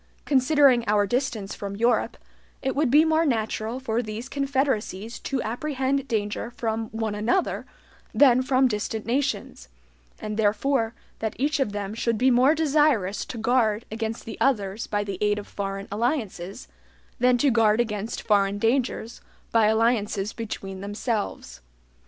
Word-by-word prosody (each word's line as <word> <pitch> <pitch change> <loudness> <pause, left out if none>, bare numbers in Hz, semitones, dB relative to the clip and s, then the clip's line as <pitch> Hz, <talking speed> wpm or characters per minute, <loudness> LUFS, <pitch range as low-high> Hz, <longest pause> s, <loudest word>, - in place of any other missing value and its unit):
Considering 270 -2 +4
our 205 0 +3
distance 225 -3 -2
from 200 -1 -6
Europe, 235 +3 +1 0.5
it 265 - -1
would 290 -2 +2
be 300 +5 +6
more 320 0 +3
natural 225 -3 -1
for 235 -2 -1
these 220 +2 -6
confederacies 265 -6 -1
to 270 - -3
apprehend 270 +3 -1
danger 210 -1 -2
from 225 -1 -2
one 220 -1 -3
another 230 - 0 0.4
than 255 -3 +5
from 260 0 +3
distant 215 -1 -3
nations, 235 - -2 0.5
and 215 0 -5
therefore 225 +2 +1 0.2
that 220 -1 -3
each 290 +3 0
of 265 -6 +1
them 205 0 -4
should 230 0 -1
be 255 +3 +4
more 255 +5 +5
desirous 295 -10 +2
to 245 - -7
guard 225 -2 +1
against 225 +1 -4
the 225 - -8
others 210 -5 0
by 205 0 -1
the 195 -2 -5
aid 210 0 +2
of 205 - -5
foreign 195 0 -5
alliances, 205 - -2 0.5
than 250 0 +4
to 275 +2 +3
guard 225 -1 +3
against 220 -1 -2
foreign 200 -2 +2
dangers 230 0 -1 0.3
by 225 -2 +4
alliances 215 -2 +1
between 195 -4 -6
themselves. 205 - -4
225 Hz, 145 wpm, -25 LUFS, 210-260 Hz, 0.5 s, be